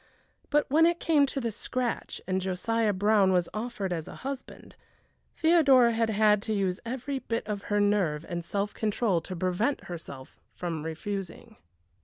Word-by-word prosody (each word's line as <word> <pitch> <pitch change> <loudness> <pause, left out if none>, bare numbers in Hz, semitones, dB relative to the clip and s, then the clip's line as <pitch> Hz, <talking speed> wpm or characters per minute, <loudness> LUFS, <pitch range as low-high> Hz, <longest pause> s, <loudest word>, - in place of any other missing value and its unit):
But 295 0 +2
when 320 +4 +5
it 340 0 +1
came 295 -4 +3
to 275 - -3
the 235 -3 -2
scratch, 245 +3 -3
and 190 0 0
Josiah 215 +4 0
Brown 205 0 +3
was 180 -2 +2
offered 215 -4 -3
as 165 -2 -4
a - - -9
husband, 275 -1 -7 0.6
Theodora 280 -8 +5
had 225 0 +1
had 210 -1 +3
to 220 - -2
use 190 -3 0
every 260 +3 -3
bit 230 -2 -3
of 205 -2 -4
her 205 0 +1
nerve 190 -7 +1
and 175 -1 -4
self 200 +4 -2
control 210 -4 0
to 185 - -7
prevent 185 +10 0
herself 140 -6 -9
from 165 -4 -4
refusing. 195 +6 -5
210 Hz, 165 wpm, -28 LUFS, 185-245 Hz, 0.6 s, when